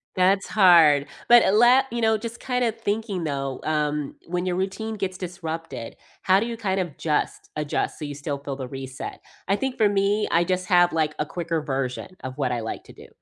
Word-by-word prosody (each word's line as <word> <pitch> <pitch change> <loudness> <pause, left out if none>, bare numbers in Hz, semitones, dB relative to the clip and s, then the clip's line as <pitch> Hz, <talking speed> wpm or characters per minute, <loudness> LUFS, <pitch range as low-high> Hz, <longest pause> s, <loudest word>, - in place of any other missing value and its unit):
That's 190 +2 +3
hard, 165 -8 +6 0.2
but 235 -4 +6
let 250 +4 +6
you 235 - -2
know, 220 -1 +3
just 230 +2 -7
kinda 250 -2 0
thinking, 210 -4 -3
though, 135 -3 -3
um, 150 -2 -1
when 175 +1 -2
your 180 -1 0
routine 195 +4 -3
gets 190 -3 -3
disrupted, 165 -9 -6 0.2
how 190 +1 +4
do 220 - -1
you 235 - -4
kind 195 -4 -1
of 175 -6 -4
just 150 -2 -2
adjust 150 -1 -2
so 155 - -4
you 145 -1 -6
still 145 0 -4
feel 140 0 -6
the 130 -1 -6
reset? 135 -1 -7 0.3
I 200 - +3
think 265 +1 -2
for 215 -2 +4
me, 200 +1 +1
I 170 +1 +3
just 185 0 -1
have, 175 -2 +4
like, 155 -2 +1
a 150 - 0
quicker 165 0 -3
version 135 +4 -3
of 130 +1 -6
what 130 -3 0
I 120 - -2
like 110 - -6
to - - -14
do, - - -14
175 Hz, 210 wpm, -24 LUFS, 150-205 Hz, 0.3 s, hard